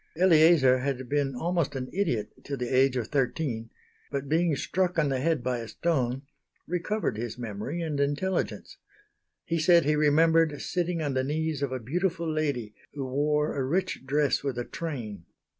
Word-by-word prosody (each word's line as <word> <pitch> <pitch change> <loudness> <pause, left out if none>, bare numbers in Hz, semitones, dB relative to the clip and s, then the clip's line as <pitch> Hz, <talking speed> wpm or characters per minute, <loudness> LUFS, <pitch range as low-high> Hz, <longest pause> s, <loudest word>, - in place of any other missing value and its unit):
Eleazar 160 -6 +5
had 130 -1 -2
been 140 -1 0
almost 170 +1 -1
an 130 -1 -3
idiot 125 - -1
till 140 -1 -4
the 125 -1 -3
age 130 0 +4
of 120 - -3
thirteen; 130 -4 -1 0.4
but, 140 -1 -3
being 160 +1 +2
struck 180 +5 -1
on 150 -3 +2
the 135 -1 0
head 155 -2 0
by 125 -1 -1
a 115 - -6
stone, 135 -4 -1 0.4
recovered 180 - -2
his 120 +1 -4
memory 120 +8 -4
and 150 -3 -2
intelligence. 145 +7 -1 0.7
He 165 0 -1
said 170 0 +5
he 150 +1 +3
remembered 155 0 +3
sitting 175 -2 -1
on 145 -2 -1
the 130 0 +1
knees 155 +1 -2
of 140 -2 -1
a 130 - -1
beautiful 170 - -1
lady 145 -9 -1 0.2
who 140 -2 -3
wore 150 +3 0
a 135 - 0
rich 180 +4 -1
dress 145 +1 +1
with 135 -3 -2
a 120 - -2
train. 115 - -6
145 Hz, 175 wpm, -28 LUFS, 130-165 Hz, 0.7 s, Eleazar